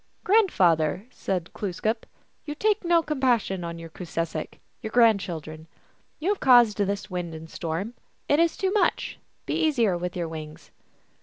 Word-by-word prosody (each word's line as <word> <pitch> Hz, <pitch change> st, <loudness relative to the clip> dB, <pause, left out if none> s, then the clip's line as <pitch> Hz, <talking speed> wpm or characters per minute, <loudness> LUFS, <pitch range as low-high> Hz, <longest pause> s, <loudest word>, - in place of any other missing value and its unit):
" -, -, -42 dB
Grandfather," 185 Hz, -, +3 dB
said 185 Hz, -7 st, -3 dB
Glooskap, 215 Hz, +3 st, -2 dB, 0.2 s
" -, -, -42 dB
you 295 Hz, -, -4 dB
take 425 Hz, +5 st, +1 dB
no 340 Hz, -1 st, +3 dB
com 300 Hz, -3 st, -3 dB
passion 230 Hz, -8 st, +1 dB
on 170 Hz, 0 st, -5 dB
your 165 Hz, -1 st, -9 dB
Koosesek, 165 Hz, -2 st, -4 dB, 0.2 s
your 220 Hz, -, -4 dB
grandchildren. 180 Hz, -9 st, +1 dB, 0.5 s
You 330 Hz, +5 st, -2 dB
have 410 Hz, -, +1 dB
caused 240 Hz, -5 st, +6 dB
this 200 Hz, 0 st, -1 dB
wind 175 Hz, -2 st, -4 dB
and 160 Hz, +1 st, -9 dB
storm; 170 Hz, +8 st, -4 dB, 0.3 s
it 290 Hz, -, +3 dB
is 335 Hz, -1 st, +2 dB
too 380 Hz, -1 st, 0 dB
much. 420 Hz, -, 0 dB, 0.3 s
Be -, -, -2 dB
easier 240 Hz, -, +2 dB
with 180 Hz, +1 st, -4 dB
your 170 Hz, -1 st, -2 dB
wings 155 Hz, -1 st, -9 dB
200 Hz, 165 wpm, -26 LUFS, 165-270 Hz, 0.5 s, caused